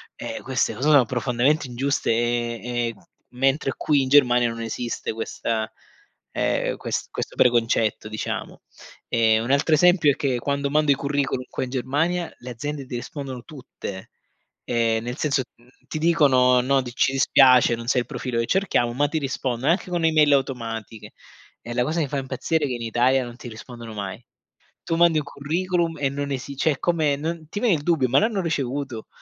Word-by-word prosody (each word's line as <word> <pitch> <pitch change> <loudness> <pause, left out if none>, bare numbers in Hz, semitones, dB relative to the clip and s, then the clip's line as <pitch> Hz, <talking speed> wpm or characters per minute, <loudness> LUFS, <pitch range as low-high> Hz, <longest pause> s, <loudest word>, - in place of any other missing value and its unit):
eh, - - -6
queste 130 -3 0
cose 135 +7 0
sono 140 -5 +6
profondamente 130 +5 0
ingiuste 135 +3 -1
e 120 0 0
e, 120 -1 -2
mhmm, - - -21 0.3
mentre 135 +2 +1
qui 145 -2 +2
in 130 - -3
Germania 125 -4 +5
non 115 0 -6
esiste 115 +1 -4
questa 110 0 -3 0.7
ehm, - - 0
ques - - -3
questo - - -5
preconcetto, 115 -3 +2
diciamo. 110 0 -5 0.5
Ehm, 115 -1 +3
un 120 - -2
altro 140 +3 +2
esempio 175 -2 +5
è - - -2
che 140 -5 -1
quando 140 +2 -1
mando 150 0 +3
i - - +4
curriculum 140 -2 -1
qua - - -3
in 130 - -5
Germania, 150 +7 -1
le 125 - -9
aziende 145 +3 -5
ti 125 - -6
rispondono 130 0 -6
tutte, 125 - -9 0.6
ehm, 115 -2 +1
nel 120 +1 -4
senso, 140 -3 0
mhmm, 120 +1 -25 0.2
ti - - -4
dicono: 135 -6 +4
"No, 135 +2 +2
t 125 - -7
ci 135 +2 +2
dispiace, 130 -2 +5
non 115 0 -9
sei 125 0 +2
il - - -8
profilo 125 -2 -3
che 115 - -1
cerchiamo", 180 -11 +1
ma 145 +4 +1
ti 160 - -2
rispondono 135 -1 -1
anche 180 +1 -1
con 175 -2 -1
e-mail 155 -2 +4
automatiche; 115 -5 -3 0.5
e 120 - -7
la 125 - +1
cosa 160 +4 -1
che 150 - 0
fa 145 - -2
impazzire 135 +4 -1
è - - -1
che 130 - -3
in 120 - -7
Italia 125 +3 +2
non 120 0 -10
ti 125 - -9
rispondono 115 0 -10
mai. 100 +1 -5 0.6
Tu 165 - -1
mandi 170 -2 +4
un 150 - -5
curriculum 170 +3 -1
e 140 - +1
non 140 +1 -4
esi 135 +1 -4
cioè 155 - +2
è 135 - -11
come 160 -5 +1
non 160 +1 -4
ti 205 - -4
viene 225 -7 +4
il 145 - -5
dubbio: 155 -6 +2
"Ma 135 - +5
l'hanno 215 -2 0
ricevuto?", 140 -7 -3
135 Hz, 195 wpm, -23 LUFS, 120-150 Hz, 0.7 s, sono